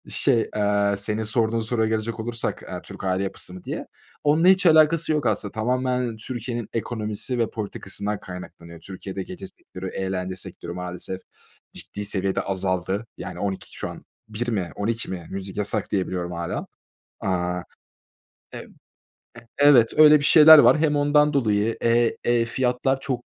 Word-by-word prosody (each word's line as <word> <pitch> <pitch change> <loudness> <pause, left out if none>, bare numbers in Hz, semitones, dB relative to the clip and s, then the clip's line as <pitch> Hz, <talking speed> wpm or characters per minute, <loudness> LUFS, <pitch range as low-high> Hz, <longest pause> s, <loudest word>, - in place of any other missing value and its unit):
Şey, 120 -5 +1
aaa, 100 -1 +1
senin 105 +2 -2
sorduğun 110 +1 +1
soruya 110 0 0
gelecek 110 +1 -2
olursak, 115 +1 -3
eee, - - -5
Türk - - -10
aile 95 0 0
yapısı 95 -2 -5
mı 90 - -10
diye, - - -5 0.4
onunla 155 +4 +4
hiç 190 0 +5
alakası 160 0 +5
yok 150 -3 0
aslında. 105 -2 0
Tamamen 125 0 -1
Türkiye'nin 120 0 -5
ekonomisi 110 +1 -3
ve 115 - +1
politikasından 105 -1 -4
kaynaklanıyor. 85 -2 -10
Türkiye'de 95 +2 -7
gece 95 +1 -8
sektörü, 95 0 -9
eğlence 95 -1 -3
sektörü 85 -1 -7
maalesef 90 +1 -5 0.5
ciddi 105 - -5
seviyede 95 -1 0
azaldı. 95 +2 -1
Yani - - -7
00.00 100 -2 -4
şu - - -4
an - - -11 0.2
01.00 110 +3 -4
mi 95 -7 -2
00.00 115 +2 -2
mi 85 -3 -6
müzik 95 0 -6
yasak 105 0 -2
diye 95 -2 0
biliyorum 90 -1 -4
hâlâ. 85 -1 -4 0.5
Aaa, 90 -1 -1 0.9
eb - - -7 0.8
e 115 0 -14
evet 140 -6 +6
öyle 150 -1 +8
bir - - -5
şeyler 155 +1 +9
var, 150 - +6
hem 150 -1 +2
ondan 150 +1 +3
dolayı. 110 -4 +1
Eee, 115 0 +2
eee, 120 -1 +3
fiyatlar 125 +2 0
çok 130 -3 -3
110 Hz, 155 wpm, -24 LUFS, 95-125 Hz, 0.9 s, şeyler